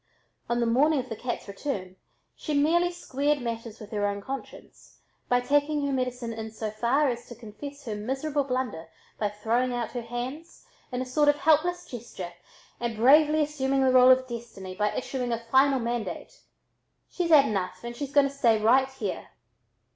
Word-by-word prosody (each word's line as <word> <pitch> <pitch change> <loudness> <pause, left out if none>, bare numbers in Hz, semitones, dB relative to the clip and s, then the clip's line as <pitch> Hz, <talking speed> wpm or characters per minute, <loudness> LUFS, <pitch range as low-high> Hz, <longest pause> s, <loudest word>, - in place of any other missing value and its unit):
On 240 0 +1
the 235 - +2
morning 285 +7 +3
of 255 0 -5
the 225 - -4
cat's 240 +2 -4
return 195 -3 -5 0.4
she 305 - -3
merely 340 +5 +3
squared 295 -4 -1
matters 230 -2 -5
with 215 -1 -11
her 205 -1 0
own 200 0 -2
conscience 270 +7 -9 0.3
by 245 - +4
taking 290 +2 +1
her 280 - -1
medicine 250 -2 -2
in 220 0 -6
so 220 -1 -5
far 245 +7 +2
as 240 -1 -5
to 240 - -9
confess 275 +6 -10
her 220 - -3
miserable 270 +7 -1
blunder 250 -11 -3 0.3
by 210 - +1
throwing 230 +4 0
out 240 -2 -3
her 245 - -4
hands 250 +8 -7 0.3
in 250 0 -2
a - - -8
sort 290 +3 +3
of 290 - +4
helpless 335 +4 +2
gesture 205 -7 -8 0.5
and 235 -2 -3
bravely 300 +6 +5
assuming 275 -2 0
the 260 - +4
role 255 0 +7
of 260 0 +5
Destiny 225 -6 -7
by 210 +2 0
issuing 250 -1 -3
a 230 - +1
final 270 +1 +5
mandate: 235 -1 -4 0.7
"She's 350 -2 -1
had 295 -4 +7
enough, 185 -3 -3
and 235 0 -6
she's 280 +2 -5
going 280 -1 +5
to 275 - -8
stay 230 -5 +3
right 260 +5 +4
here." 220 -8 -5
250 Hz, 185 wpm, -27 LUFS, 225-285 Hz, 0.7 s, role